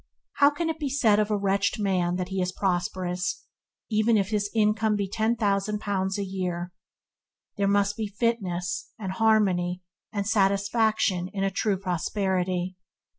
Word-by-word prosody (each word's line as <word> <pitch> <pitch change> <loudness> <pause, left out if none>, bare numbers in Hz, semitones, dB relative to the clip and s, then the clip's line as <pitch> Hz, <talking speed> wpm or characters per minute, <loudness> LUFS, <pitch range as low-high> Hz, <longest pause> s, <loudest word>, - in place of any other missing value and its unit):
How 285 0 +7
can 320 +3 -3
it 320 -1 -2
be 290 -3 -2
said 230 -6 +3
of 210 0 +1
a 210 - +1
wretched 200 +2 +1
man 180 -3 +1
that 180 0 -3
he 190 -1 -1
is 180 0 -1
"prosperous", 180 -1 -2 0.5
even 215 +1 +3
if 200 -1 0
his 205 -1 0
income 215 0 +2
be 200 -1 -1
ten 220 +4 0
thousand 205 -1 0
pounds 195 -2 -1
a 200 - -2
year? 180 -2 -3 0.8
There 200 -1 +1
must 200 0 +2
be 220 -1 -2
fitness, 200 -5 -2
and 195 -4 -4
harmony, 185 -4 +2 0.3
and 200 -3 -2
satisfaction 200 -2 +2
in 195 -1 -2
a 195 - +1
true 200 +1 0
prosperity. 185 0 -1
200 Hz, 160 wpm, -26 LUFS, 185-215 Hz, 0.8 s, How